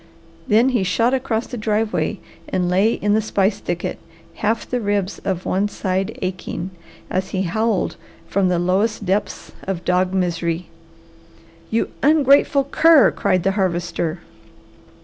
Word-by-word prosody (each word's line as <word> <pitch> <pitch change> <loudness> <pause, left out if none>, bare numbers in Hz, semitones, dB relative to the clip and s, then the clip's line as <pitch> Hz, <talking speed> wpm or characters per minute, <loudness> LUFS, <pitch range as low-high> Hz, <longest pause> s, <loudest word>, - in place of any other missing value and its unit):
Then 230 +4 +4
he 245 -5 +1
shot 230 +6 +1
across 250 -3 -1
the 245 - -7
driveway 215 0 0 0.3
and 180 -1 0
lay 195 +6 +3
in 205 0 0
the 220 - +3
spice 200 -1 0
thicket, 175 0 -3 0.4
half 220 +2 -1
the 250 -1 -2
ribs 205 -2 -1
of 185 -2 -3
one 195 +3 +1
side 190 -2 -2
aching, 185 0 -4 0.4
as 185 +1 -1
he 190 0 -1
howled 215 +3 0 0.3
from 195 -1 +1
the 180 - +1
lowest 195 +5 0
depths 195 +3 -2
of 190 -2 -4
dog 180 0 +2
misery. 175 -2 -1 1.0
"You 225 - 0
ungrateful 280 -1 +4
cur!" 315 +2 +5
cried 185 -3 0
the 195 - +2
Harvester. 175 -3 -1
195 Hz, 140 wpm, -20 LUFS, 185-225 Hz, 1.0 s, cur